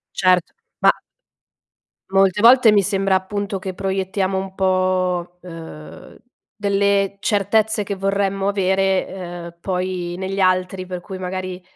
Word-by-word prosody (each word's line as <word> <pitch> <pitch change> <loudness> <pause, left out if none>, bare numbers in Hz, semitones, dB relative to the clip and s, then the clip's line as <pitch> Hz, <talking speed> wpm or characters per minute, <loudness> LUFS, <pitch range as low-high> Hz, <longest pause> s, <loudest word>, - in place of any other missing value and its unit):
Certo. 185 -2 +2 0.3
Ma - - +7 1.2
Molte 195 0 +3
volte 240 0 +7
mi 205 -1 +4
sembra, 195 0 +1
appunto, 200 +2 -2
che 190 0 -5
proiettiamo 190 0 -1
un 190 0 -4
po', 185 -2 0
uhm, 165 -3 -11 0.4
delle 200 -1 +1
certezze 210 +1 +1
che 200 0 -4
vorremmo 195 0 -1
avere, 195 -1 +1
ehm, 175 -2 -8
poi 180 -1 -3
negli 190 +1 -4
altri 185 0 +1
per 180 -1 -6
cui 190 +1 -8
magari 185 0 -5
190 Hz, 120 wpm, -20 LUFS, 185-195 Hz, 1.2 s, Ma